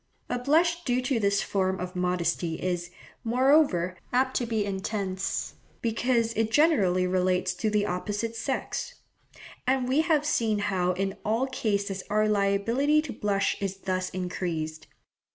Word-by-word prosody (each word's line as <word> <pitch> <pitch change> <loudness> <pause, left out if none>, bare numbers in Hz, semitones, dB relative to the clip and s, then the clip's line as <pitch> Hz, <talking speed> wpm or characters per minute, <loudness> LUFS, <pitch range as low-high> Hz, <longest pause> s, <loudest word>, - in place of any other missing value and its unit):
A 245 - 0
blush 330 +6 +2
due 250 -3 +1
to 255 -2 +1
this 200 -1 +2
form 190 -1 0
of 180 +1 -5
modesty 175 -2 0
is, 175 0 -2 0.3
moreover, 245 - +3 0.2
apt 260 +1 +1
to 240 - -1
be 220 -3 0
intense, 195 -1 -3 0.3
because 230 0 +1
it 225 0 0
generally 210 - +3
relates 185 0 +1
to 180 +5 -1
the 210 -1 +1
opposite 205 +4 -3
sex; 265 +4 -3 0.7
and 260 -1 +2
we 270 +5 +3
have 315 -3 +2
seen 225 -7 +1
how 185 -3 0
in 195 +1 -2
all 225 +5 +1
cases 200 -6 -1
our 215 +1 +2
liability 215 +9 +2
to 280 - -6
blush 200 -1 0
is 195 -1 -2
thus 185 -1 -2
increased. 170 -4 -4
205 Hz, 145 wpm, -27 LUFS, 185-245 Hz, 0.7 s, moreover